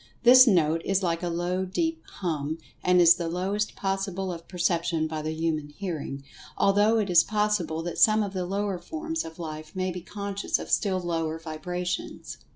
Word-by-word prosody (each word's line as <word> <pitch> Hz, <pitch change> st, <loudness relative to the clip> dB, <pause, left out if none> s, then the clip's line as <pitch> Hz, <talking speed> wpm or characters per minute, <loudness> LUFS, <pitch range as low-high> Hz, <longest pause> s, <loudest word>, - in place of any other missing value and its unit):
This 255 Hz, +1 st, +9 dB
note 165 Hz, -5 st, +3 dB
is 195 Hz, 0 st, 0 dB
like 170 Hz, -1 st, 0 dB
a 175 Hz, -, -2 dB
low, 175 Hz, +2 st, -1 dB
deep 325 Hz, -, -2 dB, 0.2 s
"hum," 155 Hz, -3 st, -2 dB, 0.3 s
and 180 Hz, 0 st, +4 dB
is 170 Hz, -1 st, +8 dB
the 170 Hz, -1 st, -4 dB
lowest 195 Hz, +5 st, -2 dB
possible 195 Hz, -1 st, -2 dB
of 165 Hz, -1 st, -10 dB
perception 170 Hz, -2 st, 0 dB
by 155 Hz, -1 st, -4 dB
the 155 Hz, -, -3 dB
human 160 Hz, -2 st, -2 dB
hearing, 150 Hz, -5 st, -5 dB, 0.3 s
although 205 Hz, +3 st, +4 dB
it 210 Hz, -3 st, +1 dB
is 175 Hz, -2 st, +6 dB
pos[Pg 210 Hz, -4 st, 0 dB
130]sible 160 Hz, +1 st, -4 dB
that 175 Hz, 0 st, -4 dB
some 215 Hz, -2 st, +5 dB
of 200 Hz, -1 st, -5 dB
the 180 Hz, -2 st, -2 dB
lower 200 Hz, -1 st, -2 dB
forms 325 Hz, -, -4 dB
of 160 Hz, 0 st, -10 dB
life 155 Hz, -1 st, -7 dB
may 185 Hz, 0 st, -1 dB
be 180 Hz, 0 st, -6 dB
conscious 200 Hz, +2 st, -3 dB
of -, -, -8 dB
still 190 Hz, -3 st, +2 dB
lower 165 Hz, -2 st, -2 dB
vibrations. 180 Hz, +3 st, -5 dB
180 Hz, 185 wpm, -27 LUFS, 165-200 Hz, 0.3 s, This